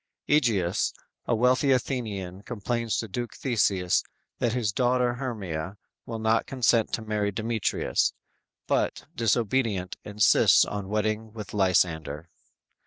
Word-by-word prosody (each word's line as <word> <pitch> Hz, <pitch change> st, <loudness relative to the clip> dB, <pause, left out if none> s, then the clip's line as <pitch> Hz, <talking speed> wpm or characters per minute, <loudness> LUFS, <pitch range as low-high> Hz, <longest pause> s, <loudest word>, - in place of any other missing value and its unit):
"_ 145 Hz, -, +6 dB
Egeus, 105 Hz, -, +1 dB, 0.3 s
a 120 Hz, -, +2 dB
wealthy 125 Hz, +4 st, +3 dB
Athenian 105 Hz, -8 st, -2 dB
complains 115 Hz, 0 st, -2 dB
to 110 Hz, -, -2 dB
Duke 120 Hz, +4 st, -5 dB
Theseus 100 Hz, -8 st, +1 dB, 0.4 s
that 120 Hz, -2 st, +1 dB
his 120 Hz, -5 st, 0 dB
daughter 125 Hz, 0 st, +2 dB
Hermia 100 Hz, -8 st, -4 dB, 0.3 s
will 115 Hz, -, -4 dB
not 110 Hz, +1 st, +1 dB
consent 120 Hz, -4 st, +2 dB
to 110 Hz, -, -1 dB
marry 105 Hz, -1 st, -1 dB
Demetrius, 110 Hz, -, 0 dB, 0.5 s
but -, -, 0 dB
disobedient, 115 Hz, -4 st, 0 dB
insists 105 Hz, 0 st, +5 dB
on 100 Hz, -2 st, -5 dB
wedding 110 Hz, +1 st, -1 dB
with 105 Hz, -2 st, -8 dB
Lysander. 85 Hz, -5 st, +1 dB
110 Hz, 120 wpm, -27 LUFS, 95-120 Hz, 0.5 s, "_